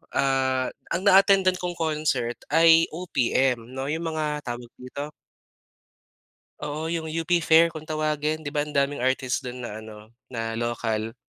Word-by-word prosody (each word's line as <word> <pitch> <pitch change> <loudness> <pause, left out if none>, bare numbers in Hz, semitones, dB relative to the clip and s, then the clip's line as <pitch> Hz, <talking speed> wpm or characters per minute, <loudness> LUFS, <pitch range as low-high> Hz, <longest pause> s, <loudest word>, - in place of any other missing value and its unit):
ah, 130 -1 +1 0.2
ang 175 +2 -1
na-attendan 195 -1 +6
kong 175 -1 -3
concert 150 -7 0
ay 165 +1 +6
OPM 130 -7 0
'no 135 +1 -3
'yong 160 +2 -2
mga 155 -2 -2
tawag 120 0 -6
dito 140 +4 -6 1.5
Oo, 150 +2 -4
'yong 165 -1 -2
UP 165 +2 -3
Fair 165 +1 +5
kung 155 -1 -9
tawagin, 155 0 -1
'di 145 - -4
ba 145 0 -1
ang 150 - -9
daming 140 0 +1
artist 130 0 0
do'n 125 0 -6
na 110 -2 -6
ano, 110 0 -12 0.2
na 115 -2 -4
local? 115 -2 -2
145 Hz, 150 wpm, -25 LUFS, 125-160 Hz, 1.5 s, na-attendan